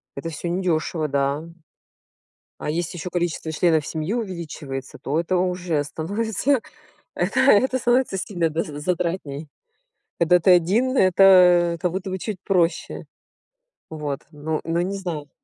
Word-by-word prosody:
это 155 +4 -5
всё 165 +2 -5
недёшево, 170 -3 -1
да. 140 +1 0 1.2
А - - -3
если 170 +2 -3
ещё 180 +3 -5
количество 170 -2 -2
членов 160 -2 +2
семьи 160 +4 -3
увеличивается, 165 - -5
то 145 +3 -2
это 170 +2 0
уже 180 -4 0
становится, 220 - -1 0.5
это 260 - 0
это 260 0 +4
становится 240 -4 +1
сильно, 175 -4 -1
да, 160 +2 -1
за 145 -3 -7
затратнее. 165 -3 -2 0.7
Когда 170 +1 +4
ты 175 - +3
один, 200 +10 +3
это 180 -3 +5
как 180 -2 0
будто 190 +1 -4
бы 190 - -3
чуть 205 +1 -5
проще. 180 -3 0 0.8
Вот. 150 -3 -4
Но 155 +1 -3
но 165 +1 0
не 190 +3 -2
знаю. 165 -6 -5
175 Hz, 140 wpm, -23 LUFS, 155-190 Hz, 1.2 s, это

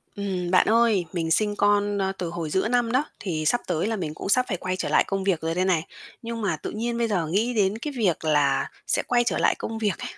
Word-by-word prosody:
Ừm, 190 -3 -3
bạn 185 - +4
ơi, 225 -5 +3
mình 165 -2 -2
sinh 210 +4 +2
con, 205 0 +2
ơ, 190 -1 0
từ 175 - -3
hồi 170 -2 -4
giữa 190 +6 +1
năm 240 0 +1
đó, 260 +4 +2 0.2
thì 160 -6 -3
sắp 240 +10 +2
tới 165 +5 0
là 225 - -1
mình 165 -7 -4
cũng 175 - -6
sắp 250 +5 +4
phải 185 - -2
quay 185 +1 -3
trở 185 - -3
lại - - +4
công 195 -1 -2
việc 190 -4 +1
rồi 165 +1 -2
đây 185 +1 +1
này. 175 -4 +2 0.4
Nhưng 230 0 -5
mà 190 -6 0
tự 150 - -6
nhiên 235 +2 -2
bây 235 -1 +1
giờ 180 -7 0
nghĩ 215 +9 0
đến 205 -2 +1
cái 290 +5 -5
việc 185 -8 0
là 145 -3 +2 0.2
sẽ - - +1
quay 240 -1 +3
trở 240 - 0
lại - - +3
công 225 - -5
việc 210 -5 -1
ấy, - - -5
195 Hz, 270 wpm, -25 LUFS, 170-225 Hz, 0.4 s, bạn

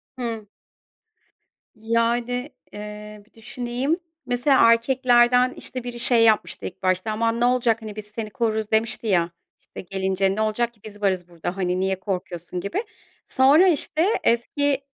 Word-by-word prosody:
Hımm. 230 -4 -5 1.3
Yani, 235 +3 -1 0.2
eee, 210 0 -9
bir 215 - -32
düşüneyim. 245 +7 -3 0.3
Mesela 245 -1 +4
erkeklerden, 245 +1 +3
işte, 255 -1 -4
biri 240 -1 -6
şey 235 -1 +4
yapmıştı 220 -2 +2
ilk 185 - -8
başta: 185 +3 0
"Aman 230 +2 0
ne 240 - +3
olacak, 245 -2 +2
hani 215 -2 -8
biz 215 -1 -6
seni 215 +1 -6
koruruz," 220 -1 -2
demişti 225 +1 +1
ya, 175 -4 +2 0.3
"İşte, - - -10
gelince 190 +1 -1
ne 215 - -1
olacak 230 +2 0
ki 220 - -30
biz 205 -1 -10
varız 185 -3 0
burada. 175 +1 -6
Hani, 180 -1 -1
niye 190 0 -1
korkuyorsun?" 180 -3 -5
gibi. 345 - -3 0.4
Sonra, 285 +8 +5
işte, 320 -1 +1 0.2
eski 280 +4 +1
225 Hz, 150 wpm, -23 LUFS, 205-245 Hz, 1.3 s, Sonra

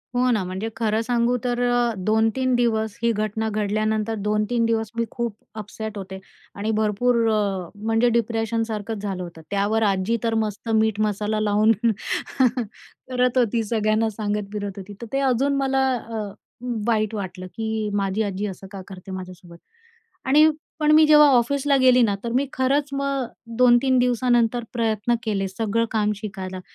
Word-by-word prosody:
हो 250 +1 +3
ना, 215 -5 +1
म्हणजे 190 +5 -4
खरं 220 -1 0
सांगू 240 +1 +1
तर 245 -1 -1
अ, 240 -1 +2
2-3 220 +6 +1
दिवस 220 -2 0
ही 235 - +3
घटना 215 +1 -2
घडल्यानंतर 215 +1 -1
2-3 215 +3 +1
दिवस 225 -1 -1
मी 230 - +1
खूप 235 -3 -3 0.3
अपसेट 215 0 -6
होते 190 0 -7 0.4
आणि 210 +2 -2
भरपूर 220 +3 +1 0.2
अ, 200 -4 -1
म्हणजे 225 +3 +1
डिप्रेशनसारखंच 225 -2 -1
झालं 195 -3 -3
होतं. 170 -2 -10
त्यावर 205 +3 +1
आजी 195 +3 +1
तर 230 -1 0
मस्त 215 +2 -5
मीठ-मसाला 215 -1 +1
लावून 215 +1 +3 1.4
करत 250 0 +1
होती, 235 -1 +2
सगळ्यांना 220 0 +1
सांगत 205 -1 -3
फिरत 205 -1 -3
होती, 195 +1 -8
तर - - -5
ते 275 - +1
अजून 270 +2 +2
मला 270 -1 +1
अ, 225 -2 -5 0.6
वाईट 215 -2 +1
वाटलं, 185 -2 -6
की 220 +1 -3
माझी 200 +1 0
आजी 200 0 -3
असं 195 0 -8
का 195 - -7
करते 190 0 -10
माझ्यासोबत. 180 -2 -9 0.7
आणि 300 +4 +6 0.3
पण 300 -1 +3
मी 310 +1 +7
जेव्हा 300 -1 +8
ऑफिसला 275 +3 +2
गेली 255 -1 +6
ना, 205 -3 +2
तर 235 - -3
मी 270 +3 +2
खरंच 275 +3 +1
मग 275 -1 -1 0.3
2-3 250 +1 +5
दिवसानंतर 245 -1 +2
प्रयत्न 225 0 0
केले, 200 -3 -1
सगळं 225 +4 -1
काम 210 -1 +1
शिकायला. 190 -3 -6
220 Hz, 155 wpm, -23 LUFS, 205-240 Hz, 1.4 s, जेव्हा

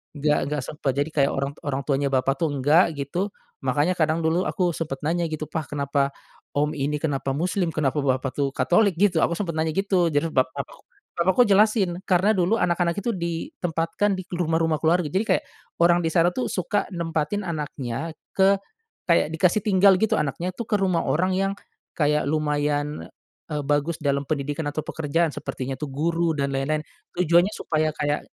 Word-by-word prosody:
enggak 150 +1 +2
enggak 150 0 -2
sempet, 150 -1 -2
jadi 145 +2 0
kayak 140 -2 +2
orang 140 +1 -1
t - - -19
orang 140 -1 -1
tuanya 140 0 0
bapak 135 +1 +1
tuh 165 - +2
enggak, 150 +4 +3
gitu. 145 +8 -2 0.3
Makanya 145 +7 +1
kadang 160 +1 +1
dulu 165 +3 +1
aku 180 -4 0
sempet 155 -4 -4
nanya 170 +1 0
gitu, 155 -1 -4
"Pa, 160 - -3
kenapa 140 -1 0 0.5
om 150 +1 +1
ini, 145 +1 -1
kenapa 140 -3 -2
Muslim? 180 +3 0
Kenapa 150 -2 0
Bapak 130 -1 0
tuh 140 0 0
Katolik?" 195 -1 +3
gitu, 185 -3 +3
aku 170 - +1
sempet 180 -5 -2
nanya 160 0 0
gitu, 195 -3 +2
jadi 160 +2 0
bapakku 130 -1 -2 0.4
bapakku 190 +8 +5
jelasin, 200 -3 +3
karena 190 +4 +4
dulu 190 +3 +2
anak-anak 175 -2 +1
itu 205 +4 -1
ditempatkan 170 +2 -2
di 185 - -5
k - - -12
rumah-rumah 160 -2 +1
keluarga, 170 +2 +3
jadi 195 +6 +1
kayak - - -8 0.4
orang 175 0 +5
di 165 - 0
sana 170 +2 +3
tuh 255 - -2
suka 200 +2 -1
nempatin 165 +4 -1
anaknya 150 -2 -4 0.2
ke 195 +1 +5 0.5
kayak 170 -3 +3
dikasih 180 +5 +3
tinggal 195 -1 +5
gitu 220 - +2
anaknyatuh 175 - -3
ke 220 - -1
rumah 185 -4 +1
orang 185 +4 +1
yang 195 +1 +1 0.4
kayak 150 -1 +1
lumayan, 150 0 -1 0.5
eee, 150 - -1
bagus 145 +3 0
dalam 140 -1 0
pendidikan 145 +2 -2
atau 150 - -3
pekerjaan, 160 +3 0
sepertinya 135 -2 -5
tuh 150 - -4
guru 165 +3 0
dan 140 -2 -1
lain-lain, 140 +3 0 0.3
tujuannya 175 +3 +3
supaya, 155 -1 0
kayak, 145 -1 -1
160 Hz, 175 wpm, -24 LUFS, 145-180 Hz, 0.5 s, bapakku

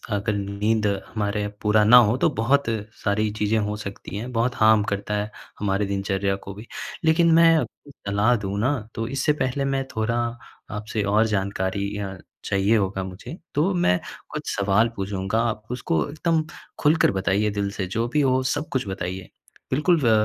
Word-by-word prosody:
अगर 105 +2 -1
नींद 105 +2 0 0.2
हमारे 105 -1 -2
पूरा 105 0 +4
ना 120 +4 +8
हो, 115 0 +5
तो 160 - +3
बहुत 135 +6 +2 0.4
सारी 105 +1 +1
चीज़ें 105 +1 +2
हो 105 0 -1
सकती 100 -1 -7
हैं, 120 +4 -5
बहुत 120 +2 +1
हार्म 110 -2 +5
करता 100 +1 -2
है, 105 +1 -2 0.3
हमारे 100 0 0
दिनचर्या 100 0 -1
को 100 - -6
भी। 105 +3 -11 0.4
लेकिन 165 +1 +4
मैं 165 0 +7
आपको 140 +2 -5 0.2
सलाह 105 +4 +3
दूँ 100 -2 -3
ना, 130 +5 +1 0.2
तो 115 0 -2
इससे 135 +3 +1
पहले 130 +2 0
मैं 135 0 0
थोड़ा 110 +1 0 0.6
आपसे 105 0 -3
और 110 +1 +5
जानकारी 100 0 -1
अ, 95 -2 -5 0.3
चाहिए 100 +3 +2
होगा 95 -1 -1
मुझे, 95 - -8 0.2
तो 165 +7 +2
मैं 130 - +2 0.3
कुछ - - -4
सवाल 100 +3 +3
पूछूँगा, 95 +2 -2
आप 110 -2 -1
उसको 80 -10 0
एकदम 160 +1 0 0.4
खुलकर 155 +2 +4
बताइए 100 +2 +1
दिल 100 -1 -1
से, 100 -2 -3
जो 115 +5 -1
भी 150 - +3
हो, 130 -1 +3
सब 145 +4 -1
कुछ 125 -6 -1
बताइए। 95 -1 -5 0.4
बिल्कुल 165 +6 +3
व 115 - +4
105 Hz, 175 wpm, -24 LUFS, 100-125 Hz, 0.6 s, ना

